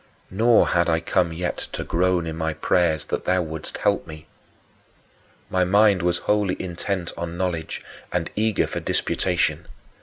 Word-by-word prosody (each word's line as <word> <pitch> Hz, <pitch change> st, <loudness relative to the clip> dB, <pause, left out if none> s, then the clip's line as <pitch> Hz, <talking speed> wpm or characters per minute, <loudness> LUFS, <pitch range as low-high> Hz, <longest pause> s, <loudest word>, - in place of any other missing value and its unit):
Nor 115 Hz, +4 st, +4 dB
had 85 Hz, -1 st, +2 dB
I 80 Hz, 0 st, +3 dB
come 85 Hz, +1 st, +1 dB
yet 90 Hz, +2 st, -3 dB, 0.2 s
to -, -, -3 dB
groan 90 Hz, 0 st, +1 dB
in 80 Hz, -1 st, -4 dB
my 80 Hz, -1 st, -2 dB
prayers 80 Hz, -1 st, +1 dB
that -, -, -3 dB
thou 90 Hz, -1 st, +2 dB
wouldst 80 Hz, -1 st, -6 dB
help -, -, +1 dB
me. 75 Hz, -1 st, -10 dB, 1.2 s
My 95 Hz, 0 st, +1 dB
mind 100 Hz, +1 st, +4 dB
was 85 Hz, 0 st, +1 dB
wholly 105 Hz, -3 st, +1 dB
intent 90 Hz, 0 st, -3 dB
on 85 Hz, 0 st, -5 dB
knowledge 85 Hz, -3 st, -3 dB, 0.3 s
and 90 Hz, -2 st, -2 dB
eager 110 Hz, -1 st, +2 dB
for -, -, -4 dB
disputation. -, -, 0 dB
90 Hz, 155 wpm, -23 LUFS, 80-95 Hz, 1.2 s, Nor